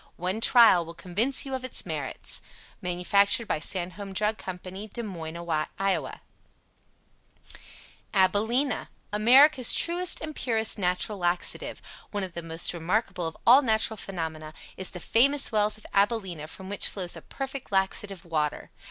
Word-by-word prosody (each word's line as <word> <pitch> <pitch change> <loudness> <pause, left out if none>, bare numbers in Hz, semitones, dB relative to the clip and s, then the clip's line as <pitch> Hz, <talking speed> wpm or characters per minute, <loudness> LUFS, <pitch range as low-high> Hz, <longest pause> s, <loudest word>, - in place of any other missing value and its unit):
One 185 +5 -2
trial 230 -8 +6
will 165 +1 -11
convince 220 +13 +1
you 270 - -5
of 260 -1 -3
its 255 - -2
merits. - - -5 0.4
Manufactured 200 +5 +1
by - - -1
SANDHOLM 185 +3 -2
DRUG 210 +2 -1
CO. 185 -1 -6 0.4
Des 235 - -3
Moines, 170 -4 -4
Iowa 185 -8 -1 1.9
ABILENA 220 +7 +2 0.2
America's 255 +5 +6
Truest 350 +1 +1
and 310 -1 -6
Purest 225 -3 +1
Natural 185 +2 -1
Laxative. 175 0 -2 0.3
One 205 -1 -3
of 185 -2 -6
the 170 - -5
most 165 +1 +2
remarkable 180 +1 -1
of 160 - -7
all 255 +4 +8
natural 220 -3 +1
phenomena 160 -6 -6 0.2
is 190 - -3
the 180 - -8
FAMOUS 275 +9 +3
WELLS 215 -1 +1
OF 215 - -16
ABILENA 195 -6 0
from 190 +4 -10
which 200 0 +2
flows 180 -3 -4
a - - -9
perfect 270 -3 -7
laxative 195 -1 -1
water. 155 -3 -2
195 Hz, 145 wpm, -27 LUFS, 175-225 Hz, 1.9 s, all